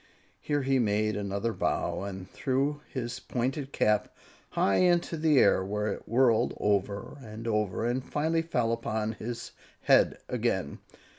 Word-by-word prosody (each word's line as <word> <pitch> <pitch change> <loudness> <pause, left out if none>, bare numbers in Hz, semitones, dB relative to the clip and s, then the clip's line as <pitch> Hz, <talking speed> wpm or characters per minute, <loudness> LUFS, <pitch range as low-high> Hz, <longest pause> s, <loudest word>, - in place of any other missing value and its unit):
Here 145 -1 -1
he 135 0 +2
made 110 -1 +1
another 100 +3 -2
bow - - -1
and 95 -2 -6
threw 140 +6 -1
his 125 -1 -4
pointed 130 +3 -2
cap 105 -5 +1 0.4
high 95 - +2
into 175 -2 +3
the 155 -2 +3
air, 95 - +5
where 105 +2 -2
it - - -10
whirled 120 -1 +3
over 105 +5 -1
and 110 -1 -8
over 105 -2 0
and 125 +2 0
finally 160 +4 0
fell 125 -8 0
straight 115 - -16
upon 110 0 -1
his 115 +2 -6 0.3
head - - +4
again. - - -1
115 Hz, 150 wpm, -29 LUFS, 105-135 Hz, 0.4 s, air